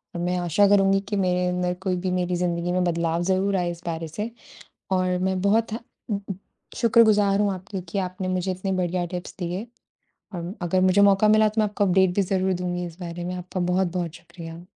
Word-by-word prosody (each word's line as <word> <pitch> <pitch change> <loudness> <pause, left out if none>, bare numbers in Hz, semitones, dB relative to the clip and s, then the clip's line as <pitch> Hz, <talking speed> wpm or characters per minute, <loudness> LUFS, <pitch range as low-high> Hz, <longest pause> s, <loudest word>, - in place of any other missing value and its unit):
और 170 - -3
मैं 180 +1 0
आशा 175 +3 +3
करुँगी 195 -1 +4
कि 205 - -1
मेरे 180 -1 +1
अंदर 180 0 0
कोई 190 -2 0
भी 185 - +1
मेरी 180 0 0
ज़िंदगी 175 0 -1
में 180 0 +1
बदलाव 170 -1 0
ज़रूर 190 +2 +1
आए 175 -2 0
इस 170 0 -9
बारे 165 -1 -3
से 210 +8 -4 0.6
और 185 -1 +1
मैं 190 0 0
बहुत 215 +3 +2
थें 225 - -2 1.0
शुक्रगुजार 210 -4 +4
हूँ 205 -1 +2
आपकी 190 +1 -6
कि 185 - -3
आपने 185 0 -3
मुझे 185 0 -1
इतनी 185 +1 -3
बढ़िया 180 -1 0
टिप्स 180 0 -6
दिए 180 +4 -3 0.7
और 175 +1 -5
अगर 175 +2 +1
मुझे 185 +2 +4
मौका 200 +1 +5
मिला 215 0 +5
तो 215 +1 0
मैं - - +3
आपको 205 0 0
अपडेट 190 -1 +3
भी 200 - +3
ज़रूर 190 0 0
दूँगी 180 0 -3
इस 170 0 -10
बारे 175 -1 -6
में, 180 +1 -3
आपका 180 +1 -5
बहुत-बहुत 180 -2 0
शुक्रिया। 165 -1 -10
185 Hz, 205 wpm, -24 LUFS, 175-195 Hz, 1.0 s, मौका